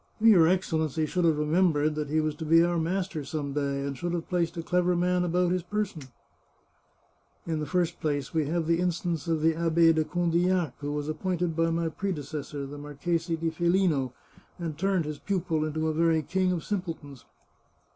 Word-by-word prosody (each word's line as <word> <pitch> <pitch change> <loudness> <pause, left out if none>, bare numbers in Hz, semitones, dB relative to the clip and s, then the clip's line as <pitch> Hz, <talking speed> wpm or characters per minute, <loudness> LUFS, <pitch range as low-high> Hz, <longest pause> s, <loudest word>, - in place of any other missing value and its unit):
" - - -36
Your 210 -7 +6
Excellency 160 -4 0
should 180 +2 0
have 160 -2 +3
remembered 155 -1 +2
that 150 -1 -3
he 155 +1 +2
was 155 -1 -1
to 160 - -5
be 165 +2 +5
our 175 0 +1
master 175 -1 -2
some 140 0 -4
day, 140 -1 -1
and 140 -1 -3
should 175 +6 -3
have 170 -2 -3
placed 170 -2 0
a 165 - -3
clever 180 +1 +1
man 180 +1 +1
about 180 0 +1
his 180 0 +1
person." 200 -2 -3 0.8
" - - -40
In 160 -2 -2
the 150 - -3
first 175 -2 0
place, 145 -3 -2
we 155 -3 +1
have 165 +1 0
the 165 +1 +2
instance 175 -3 -1
of 160 -2 0
the 165 0 +4
Abbe 165 0 +4
de 160 -1 +2
Condillac, 175 -2 +1
who 145 0 -4
was 145 0 -3
appointed 170 +1 -1
by 165 0 +2
my 165 0 0
predecessor, 150 -5 -4
the 145 +1 -8
Mar 145 0 -9
chese 170 +3 -1
di 165 -1 -1
Felino, 170 -6 +1 0.5
and 165 -3 -4
turned 190 0 0
his 150 -1 -5
pupil 175 -5 -1
into 155 +1 -1
a 155 - 0
very 165 0 +2
king 185 +3 0
of 175 -3 -2
simpletons. 165 - -5
165 Hz, 200 wpm, -28 LUFS, 155-175 Hz, 0.8 s, Your